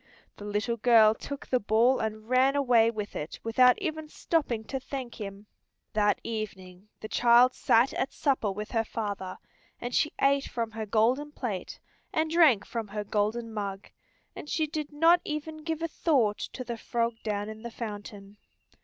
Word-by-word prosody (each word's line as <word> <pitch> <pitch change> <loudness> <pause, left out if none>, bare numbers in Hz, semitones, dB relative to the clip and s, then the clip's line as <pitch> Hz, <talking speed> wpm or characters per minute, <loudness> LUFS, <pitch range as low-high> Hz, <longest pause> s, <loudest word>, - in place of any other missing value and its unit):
The 205 - -9
little 210 +3 -1
girl 225 -2 +6
took 280 +5 -7
the 255 - +1
ball 230 +5 +3
and 215 0 -4
ran 260 +2 +3
away 245 -5 +4
with 210 -3 -5
it 150 - -5
without 250 +2 +5
even 315 -5 -4
stopping 285 -10 -1
to 265 +5 -4
thank 260 -3 -7
him. 200 0 -7 0.5
That 210 -1 +2
evening 195 -4 -6
the 215 - -5
child 240 +2 +5
sat 235 +4 +3
at - - -2
supper 260 -8 0
with 210 +2 -6
her 225 -2 +1
father, 200 -4 -4 0.4
and 245 +1 -5
she 300 - +2
ate 275 0 +3
from 230 -2 -3
her 220 -1 -5
golden 245 +8 +1
plate, 215 -11 -5 0.3
and 315 0 0
drank 310 - +5
from 230 -3 -4
her 210 +1 -4
golden 220 +3 -1
mug, 200 -2 -5 0.5
and 295 - -8
she 315 - +1
did 300 -1 -5
not 330 +4 +4
even 305 0 -4
give 320 +1 -4
a - - +1
thought 265 -11 +1
to 255 - -5
the 235 -2 -5
frog 235 +1 -1
down 205 -1 -2
in 220 0 -8
the 235 - -6
fountain. 205 -3 -8
230 Hz, 175 wpm, -28 LUFS, 210-275 Hz, 0.5 s, girl